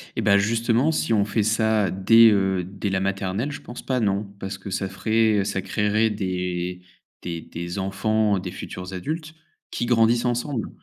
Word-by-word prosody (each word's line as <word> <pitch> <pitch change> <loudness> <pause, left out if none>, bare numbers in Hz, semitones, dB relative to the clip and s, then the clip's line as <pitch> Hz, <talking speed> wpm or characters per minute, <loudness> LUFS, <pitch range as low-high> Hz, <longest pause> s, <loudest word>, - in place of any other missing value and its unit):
Et - - -1
beh 100 -1 +4
justement, 115 +7 +2
si 155 -5 0
on 100 -2 +3
fait 105 +1 0
ça 110 -1 +2
dès, 115 +5 +6
heu, 95 -2 +1
dès 100 +3 -4
la 95 -1 0
maternelle 95 +6 -2
je 145 - -7
pense 120 - -9
pas 130 -1 0
non. 100 -2 0
Parce 95 0 -5
que 100 +1 -9
ça 95 0 -2
ferait 110 +1 +2
ça 95 - -2
créerait 105 +3 +1
des 90 -3 -3 0.4
des 85 -2 -5
des 85 +4 -6
enfants, 100 +2 +1
des - - -6
futurs 90 +1 -7
adultes, 155 - -5 0.4
qui - - -2
grandissent 120 0 +3
ensemble 120 +1 -1
105 Hz, 175 wpm, -24 LUFS, 95-115 Hz, 0.4 s, dès